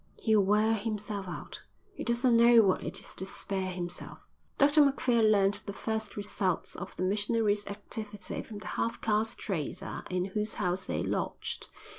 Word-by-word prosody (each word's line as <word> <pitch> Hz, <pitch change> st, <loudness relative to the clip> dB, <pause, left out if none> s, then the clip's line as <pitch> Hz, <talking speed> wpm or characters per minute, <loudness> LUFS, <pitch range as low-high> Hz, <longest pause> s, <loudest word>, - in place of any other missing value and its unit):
"He'll 220 Hz, -2 st, +4 dB
wear 210 Hz, +3 st, +3 dB
himself 210 Hz, -2 st, -3 dB
out. 180 Hz, -, -7 dB, 0.3 s
He -, -, -6 dB
doesn't 240 Hz, 0 st, +3 dB
know 235 Hz, 0 st, +7 dB
what 190 Hz, -2 st, +2 dB
it -, -, -2 dB
is -, -, -8 dB
to 190 Hz, -, -4 dB
spare 190 Hz, -1 st, -3 dB
himself." 175 Hz, -1 st, -5 dB, 0.4 s
Dr 290 Hz, +2 st, +6 dB
Macphail 255 Hz, -4 st, +2 dB
learnt 205 Hz, -2 st, +4 dB
the 200 Hz, -, -3 dB
first 220 Hz, 0 st, -3 dB
results 200 Hz, -3 st, -1 dB
of 195 Hz, -, -7 dB
the -, -, -2 dB
missionary's 205 Hz, +1 st, +1 dB
activity 205 Hz, 0 st, -5 dB
from 215 Hz, -, -9 dB
the 205 Hz, -, -9 dB, 0.2 s
half 230 Hz, +1 st, -1 dB
caste 220 Hz, 0 st, 0 dB
trader 165 Hz, -9 st, -4 dB
in 180 Hz, 0 st, 0 dB
whose 215 Hz, 0 st, -1 dB
house 180 Hz, +1 st, 0 dB
they -, -, -2 dB
lodged. -, -, -3 dB
210 Hz, 165 wpm, -30 LUFS, 195-225 Hz, 0.4 s, know